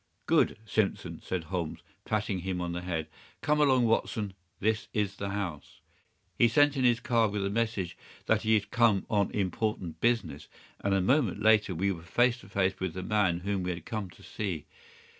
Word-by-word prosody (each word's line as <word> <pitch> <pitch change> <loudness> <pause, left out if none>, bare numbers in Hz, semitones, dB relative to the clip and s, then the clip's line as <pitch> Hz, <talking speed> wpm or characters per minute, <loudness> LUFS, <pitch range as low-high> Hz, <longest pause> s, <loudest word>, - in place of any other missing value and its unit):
"Good, - - +3
Simpson!" 110 -2 -1
said 90 -3 -3
Holmes, 85 -1 -4 0.2
patting 105 -3 -1
him 90 0 -3
on 90 -1 -2
the 90 +1 -3
head. 85 -3 -3 0.3
"Come 150 +1 +2
along, 130 -4 +4
Watson. 110 -3 0 0.3
This 110 +3 0
is 100 -3 -1
the 100 - -3
house." 95 -7 -5 0.6
He 120 - +7
sent 145 +5 +4
in 130 - 0
his 120 -2 +4
card 115 -3 +2
with 100 -1 -1
a 100 - -1
message 105 -5 -1 0.3
that 110 -1 +2
he 110 0 +3
had 105 - -1
come 115 -5 +3
on 100 -2 +2
important 95 -4 -2
business, 120 -1 0 0.3
and 100 -1 +1
a 95 - +2
moment 115 - +2
later 105 -3 +4
we 95 +4 +1
were 85 -3 -5
face 120 +8 +2
to 100 - -15
face 95 -1 0
with 95 -3 -3
the 95 - -4
man 95 -4 +1
whom 100 0 -1
we 90 - -2
had 85 -2 -4
come 105 -4 -4
to - - -17
see. 90 -8 -4
100 Hz, 195 wpm, -29 LUFS, 90-110 Hz, 0.6 s, He